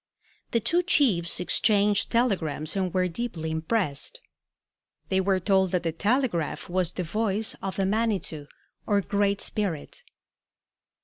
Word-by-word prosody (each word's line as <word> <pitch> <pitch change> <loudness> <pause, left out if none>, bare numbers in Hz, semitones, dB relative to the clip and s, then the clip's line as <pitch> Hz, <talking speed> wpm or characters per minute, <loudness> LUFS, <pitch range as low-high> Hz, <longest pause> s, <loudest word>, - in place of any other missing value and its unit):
The 230 - +1
two 330 +11 +1
chiefs 230 - +2
exchanged 200 +2 +3
telegrams 175 - 0
and 190 -2 0
were 185 0 +1
deeply 170 -5 -4
impressed. 160 - -1 0.9
They 190 0 +2
were 190 0 +2
told 190 0 +2
that 180 -1 +1
the 165 - 0
telegraph 205 - 0
was 180 -1 -1
the 180 - -3
voice 210 +4 -1
of 195 -1 -4
the 195 - 0
Manitou 195 -8 -1 0.4
or 205 -2 +3
Great 200 0 0
Spirit. 205 - -3
195 Hz, 130 wpm, -26 LUFS, 170-215 Hz, 0.9 s, exchanged